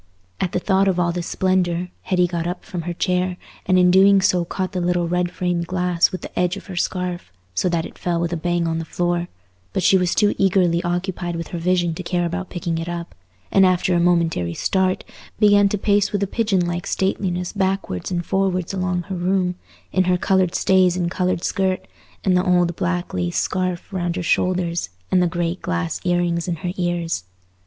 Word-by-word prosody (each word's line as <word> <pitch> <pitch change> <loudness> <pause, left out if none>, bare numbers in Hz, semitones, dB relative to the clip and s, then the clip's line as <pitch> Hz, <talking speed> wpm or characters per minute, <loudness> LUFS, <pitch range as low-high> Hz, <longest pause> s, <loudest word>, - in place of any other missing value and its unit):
At 180 - -1
the - - 0
thought 190 +1 +2
of 185 -2 +1
all 175 -1 +2
this 175 -1 -4
splendour, 180 -2 0
Hetty 180 -1 +2
got 170 -1 -2
up 180 +1 -5
from 175 - -4
her - - -2
chair, 180 +1 0 0.3
and 185 0 +4
in 180 0 +5
doing 195 +1 +6
so 180 -2 +2
caught 185 +1 -3
the 185 -2 -2
little 175 0 +1
red 180 +1 0
framed 175 -1 -2
glass 180 -1 +2
with 185 - -5
the - - -6
edge 180 +2 +1
of - - -10
her 190 - -8
scarf, 180 - -2 0.2
so 140 - +1
that 170 -2 0
it - - -11
fell 175 -1 -1
with 170 0 -1
a - - +1
bang 175 0 0
on 165 0 -1
the - - -3
floor; 175 +1 -1 0.5
but 185 - 0
she 190 +2 +5
was 180 -1 0
too 205 -1 +3
eagerly 180 -3 +3
occupied 175 0 -2
with 165 0 -5
her 175 - -4
vision 175 -1 +1
to 165 - -6
care 175 -1 -1
about 180 +2 -3
picking 170 -2 -3
it 165 +1 -4
up; 170 0 -5 0.4
and 195 - +5
after 185 0 +3
a 175 - +3
momentary 165 - +1
start, 190 -1 +1 0.4
began 205 -2 +5
to 210 - -1
pace 205 0 +2
with 205 -1 0
a - - +3
pigeon 200 -3 +1
like 175 0 -3
stateliness 180 -2 -1
backwards 190 - -1
and 175 -2 -2
forwards 190 -2 0
along 180 -2 -1
her 190 +1 -5
room, 180 0 +1 0.4
in 185 -1 +2
her 180 0 +3
coloured 185 -1 +1
stays 185 -2 +3
and 175 -1 -1
coloured 180 -2 0
skirt, 190 -1 0 0.4
and 185 -2 +3
the 180 - +3
old 175 -2 +2
black 175 0 -2
lace 85 -1 -1
scarf 185 0 -2
round 175 -2 -1
her 180 - -3
shoulders, 175 - 0 0.2
and 185 - +4
the 180 - +3
great 175 +1 -2
glass 85 -1 -2
ear 175 -1 +2
rings 170 -1 -1
in 175 - -1
her 175 +2 -4
ears. 175 - -1
180 Hz, 215 wpm, -21 LUFS, 175-185 Hz, 0.5 s, doing